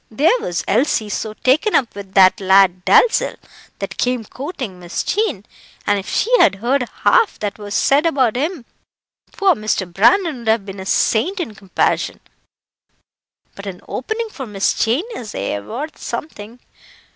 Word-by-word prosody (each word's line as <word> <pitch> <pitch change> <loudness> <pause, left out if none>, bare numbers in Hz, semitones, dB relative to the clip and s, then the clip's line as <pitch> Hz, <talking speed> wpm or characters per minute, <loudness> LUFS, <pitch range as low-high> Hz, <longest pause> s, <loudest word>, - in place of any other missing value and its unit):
There 315 - +2
was 170 - -3
Elsie 220 -1 +1
so 215 +1 -4
taken 305 - +2
up 245 - +1
with 200 -1 -10
that 190 +2 +6
lad 190 -1 +4
Dalzell, 475 - +4 0.4
that - - -6
came 245 -2 0
courting 255 - -7
Miss 175 0 -4
Jean, 390 - -1 0.4
and 205 0 +2
if 195 - -8
she - - +2
had 195 - +5
heard 250 +5 -1
half 460 -4 +4
that 205 0 -4
was 205 -1 -6
said 290 +4 +3
about 260 -8 +1
him, 295 0 -2 0.7
poor 395 -2 +3
Mr. 215 -2 -1
Brandon 270 - +2
would 235 - -10
have 220 -2 +2
been 195 -1 -8
a 190 - -7
saint 355 - +1
in 305 -11 -4
comparison. 200 -3 -1 1.3
But 200 0 -10
an 180 -2 -7
opening 440 - -3
for 270 - -8
Miss 200 -2 0
Jane 245 - 0
is 220 - -7
aye 100 +1 -2
worth 265 - -7
something. 230 -5 -7
225 Hz, 160 wpm, -19 LUFS, 195-300 Hz, 1.3 s, that